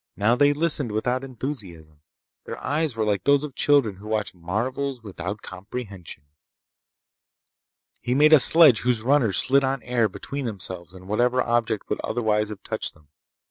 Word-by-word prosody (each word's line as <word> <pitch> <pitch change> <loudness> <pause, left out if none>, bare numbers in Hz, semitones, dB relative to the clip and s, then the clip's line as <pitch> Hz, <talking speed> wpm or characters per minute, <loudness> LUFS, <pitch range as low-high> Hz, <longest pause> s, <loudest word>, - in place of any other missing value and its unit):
Now 110 +4 +2
they 145 +2 +4
listened 145 -5 +2
without 125 +4 -1
enthusiasm. 100 - -7 0.4
Their - - -7
eyes 150 -1 -2
were 110 -1 -1
like 100 -3 -1
those 140 0 +3
of 150 -3 -6
children 130 -9 +2
who 105 +2 -12
watch 110 -1 -2
marvels 120 +9 -4
without 100 0 -7
comprehension. 95 - -8 1.8
He 125 - -1
made 150 +3 +5
a 155 - +9
sledge 150 -5 +7
whose 120 -2 0
runners 120 -7 +2
slid 140 +1 +3
on 135 -1 -2
air 120 -3 0
between 140 +8 -6
themselves 95 -5 -5
and 95 0 -13
whatever 120 +5 +1
object 115 -3 -1
would - - -3
otherwise 105 -2 0
have 105 -2 -9
touched - - -4
them. 75 -2 -25
115 Hz, 160 wpm, -24 LUFS, 100-135 Hz, 1.8 s, a